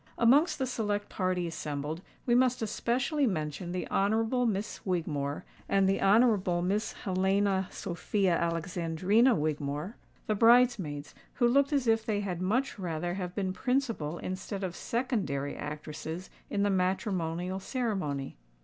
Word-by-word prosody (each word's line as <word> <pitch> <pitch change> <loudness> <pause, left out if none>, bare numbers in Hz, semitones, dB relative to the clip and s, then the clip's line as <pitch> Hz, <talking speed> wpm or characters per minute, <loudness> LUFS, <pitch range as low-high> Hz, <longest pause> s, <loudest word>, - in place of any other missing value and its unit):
Amongst 275 +8 +4
the 265 - 0
select 205 -5 -2
party 185 -2 -1
assembled, 155 -1 -4 0.2
we 240 - +2
must 250 -1 +3
especially 255 +6 0
mention 160 -1 -3
the 180 0 -3
Honourable 225 +5 +2
Miss 210 -1 -3
Wigmore 155 -5 -2 0.2
and 195 -1 +3
the 195 - +1
Honourable 195 -4 +4
Miss 200 +4 0
Helena 190 0 +1
Sophia 190 0 -1
Alexandrina 175 +7 +2
Wigmore—the 150 +8 -3
bridesmaids, 225 - +3 0.2
who 240 - +3
looked 275 +4 +3
as 280 -3 +1
if 225 -1 +3
they 215 -2 -1
had 180 -3 -3
much 220 +5 0
rather 175 -1 -2
have 180 -2 -4
been 190 -2 -1
principal 230 - -1
instead 190 +2 -5
of 180 -2 -3
secondary 210 - -2
actresses 155 +4 -6 0.2
in 200 - 0
the 205 - +2
matrimonial 185 -1 -1
ceremony. 190 - -2
190 Hz, 130 wpm, -30 LUFS, 170-225 Hz, 0.2 s, Amongst